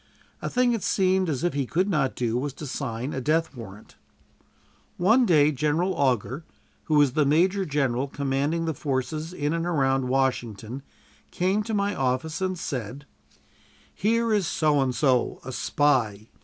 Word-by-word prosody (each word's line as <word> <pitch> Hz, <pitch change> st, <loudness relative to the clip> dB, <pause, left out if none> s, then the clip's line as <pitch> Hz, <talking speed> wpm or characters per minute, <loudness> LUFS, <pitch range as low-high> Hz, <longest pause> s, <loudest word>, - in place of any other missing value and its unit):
A -, -, -3 dB
thing 250 Hz, -1 st, +2 dB
it 225 Hz, -, -2 dB
seemed 185 Hz, -2 st, +1 dB
as 145 Hz, 0 st, -2 dB
if 175 Hz, -, +1 dB
he 140 Hz, -2 st, -1 dB
could 185 Hz, +8 st, +1 dB
not 150 Hz, -9 st, 0 dB
do 120 Hz, -2 st, -1 dB
was 135 Hz, +2 st, -2 dB
to 150 Hz, -, -8 dB
sign 125 Hz, 0 st, -4 dB
a 130 Hz, -, -3 dB
death 160 Hz, +2 st, 0 dB
warrant. 110 Hz, -3 st, -11 dB, 1.0 s
One 225 Hz, +7 st, +4 dB
day 150 Hz, -3 st, +5 dB
General 155 Hz, +6 st, 0 dB
Augur, 130 Hz, -, 0 dB, 0.4 s
who 155 Hz, -, +1 dB
was 145 Hz, -4 st, +4 dB
the 155 Hz, 0 st, +3 dB
major 185 Hz, +7 st, +2 dB
general 135 Hz, -3 st, 0 dB
commanding 140 Hz, +4 st, -1 dB
the 160 Hz, -, -1 dB
forces 150 Hz, +2 st, -3 dB
in 150 Hz, -3 st, -2 dB
and 165 Hz, +1 st, -1 dB
around 135 Hz, -5 st, +1 dB
Washington, 125 Hz, -2 st, -1 dB, 0.5 s
came 190 Hz, +4 st, 0 dB
to 215 Hz, +1 st, -3 dB
my 200 Hz, 0 st, 0 dB
office 135 Hz, +6 st, -1 dB
and 185 Hz, -1 st, -1 dB
said: 130 Hz, -3 st, -5 dB, 0.9 s
"Here 230 Hz, +2 st, +1 dB
is 200 Hz, -6 st, +1 dB
So 150 Hz, -3 st, +2 dB
and 130 Hz, -2 st, 0 dB
So, 130 Hz, -1 st, +1 dB
a 130 Hz, -, -5 dB
spy. 120 Hz, -7 st, 0 dB
145 Hz, 165 wpm, -25 LUFS, 130-175 Hz, 1.0 s, day